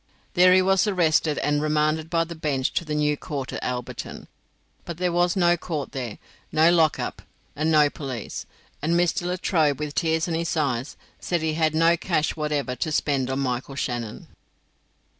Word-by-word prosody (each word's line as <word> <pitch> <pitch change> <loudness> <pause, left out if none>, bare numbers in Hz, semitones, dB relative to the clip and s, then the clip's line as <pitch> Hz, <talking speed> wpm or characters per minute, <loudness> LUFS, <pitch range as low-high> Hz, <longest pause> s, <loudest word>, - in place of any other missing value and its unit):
There 180 0 +6
he 185 - +5
was 190 +2 +3
arrested, 160 -5 +2
and 145 0 +1
remanded 155 +1 +1
by 165 -1 +2
the 165 +1 -7
bench 145 -5 -1
to - - 0
the 155 -2 -3
new 150 0 +2
court 140 -3 -5
at - - -4
Alberton. 125 -1 -5 0.6
But 170 -2 -7
there 180 0 0
was 175 0 +2
no 175 -2 +4
court 160 -5 -4
there, 125 -5 -5 0.3
no 160 +2 +5
lock 165 -3 +3
up, - - -4 0.3
and 155 +2 0
no 150 -2 +6
police; 135 -6 -6 0.3
and 160 +3 +1
Mr. 175 0 +1
Latrobe, 170 -5 +1
with 150 -1 -4
tears 160 +1 +1
in 170 - -2
his 165 0 -1
eyes, 135 -3 -1 0.2
said 175 -2 -1
he 160 -1 0
had 155 -1 +1
no 165 +1 +4
cash 170 -3 0
whatever 150 -4 -2
to 155 - -2
spend 140 -4 0
on 135 +1 -1
Michael 130 +1 -3
Shannon. 120 -5 -4
155 Hz, 180 wpm, -24 LUFS, 145-170 Hz, 0.6 s, There